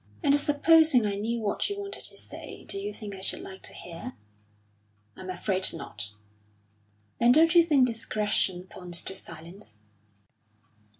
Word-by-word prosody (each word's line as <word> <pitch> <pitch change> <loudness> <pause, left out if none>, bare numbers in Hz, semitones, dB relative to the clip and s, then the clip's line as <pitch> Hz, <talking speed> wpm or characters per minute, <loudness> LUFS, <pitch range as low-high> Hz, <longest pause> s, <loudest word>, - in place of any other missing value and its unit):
"And 285 -1 +5
supposing 295 -3 +5
I 205 - 0
knew 225 +4 -2
what 205 - -1
you 405 0 -4
wanted 400 0 -5
to - - -8
say, - - -9
do 395 - -4
you 410 +1 -4
think 210 -3 -7
I 190 - -8
should - - -2
like 190 0 -10
to - - -7
hear?" 165 -7 -8 1.0
"I'm 185 - -9
afraid 185 +1 +1
not." 105 -10 -4 1.0
"Then 235 +1 +6
don't 325 +5 +6
you 345 - +8
think 295 -6 +4
discretion 210 -5 0
points 180 -1 -3
to - - -6
silence?" 165 - -9
210 Hz, 155 wpm, -28 LUFS, 185-290 Hz, 1.0 s, you